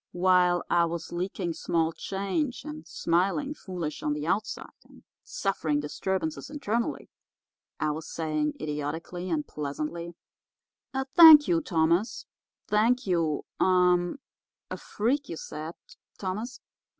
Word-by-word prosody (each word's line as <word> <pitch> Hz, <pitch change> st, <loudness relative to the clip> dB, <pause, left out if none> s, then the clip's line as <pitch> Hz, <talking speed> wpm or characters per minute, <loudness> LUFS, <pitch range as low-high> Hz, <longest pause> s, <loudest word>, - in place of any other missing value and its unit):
While 180 Hz, -1 st, +3 dB
I 170 Hz, -1 st, +3 dB
was 165 Hz, -1 st, -5 dB
leaking 175 Hz, 0 st, -3 dB
small 165 Hz, -1 st, 0 dB
change 200 Hz, -, -2 dB
and 155 Hz, +2 st, -8 dB
smiling 195 Hz, -, 0 dB
foolish 180 Hz, -, -5 dB
on 150 Hz, -, 0 dB
the 150 Hz, 0 st, -4 dB
outside, 205 Hz, +6 st, -2 dB
and -, -, -19 dB, 0.2 s
suffering 180 Hz, -, -1 dB
disturbances 190 Hz, -, -3 dB
internally, 240 Hz, -6 st, -2 dB, 0.7 s
I 155 Hz, -, +1 dB
was 155 Hz, +1 st, -6 dB
saying, 155 Hz, -2 st, -1 dB
idiotically 155 Hz, +4 st, -4 dB
and 155 Hz, -3 st, -1 dB
pleasantly: 155 Hz, +4 st, -5 dB, 0.8 s
"'Thank 295 Hz, +3 st, +8 dB
you, 335 Hz, -1 st, +2 dB
Thomas—thank 210 Hz, -, 0 dB
you—er—a 180 Hz, -, 0 dB
freak, 265 Hz, +7 st, -1 dB
you 165 Hz, -, -5 dB
said, 155 Hz, +3 st, -7 dB, 0.4 s
Thomas. 210 Hz, +6 st, -4 dB
175 Hz, 105 wpm, -28 LUFS, 160-215 Hz, 0.8 s, Thank